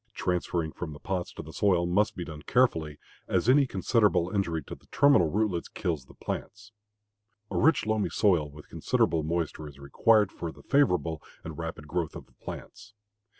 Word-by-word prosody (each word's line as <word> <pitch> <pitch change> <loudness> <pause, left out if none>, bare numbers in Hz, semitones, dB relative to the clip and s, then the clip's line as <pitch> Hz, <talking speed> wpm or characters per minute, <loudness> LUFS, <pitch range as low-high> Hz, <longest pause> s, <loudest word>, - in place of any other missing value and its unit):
Transferring 85 -2 -1
from 80 -2 -6
the 75 - -11
pots 90 -2 -3
to - - -7
the 80 - -11
soil 90 -4 +2
must 95 +5 +1
be 90 - -5
done 75 -2 -8
carefully, 80 -11 +1 0.3
as 95 +3 0
any 135 +2 +5
considerable 100 -3 +2
injury 85 -6 -1
to - - -9
the - - -14
terminal 140 - +4
rootlets 100 -2 0
kills 85 -10 -3
the - - -17
plants. 105 +1 -6 0.8
A - - -1
rich, 160 0 +4
loamy 110 -1 0
soil 85 -8 +2
with 75 +1 -13
considerable 80 - +1
moisture 80 -1 -2
is 70 -2 -12
required 105 +9 +3
for 85 - -5
the - - -16
favorable 90 - +2 0.2
and 80 -1 -7
rapid 80 -2 -6
growth 85 +1 -2
of - - -8
the - - -29
plants. 100 +2 -10
90 Hz, 180 wpm, -28 LUFS, 80-105 Hz, 0.8 s, any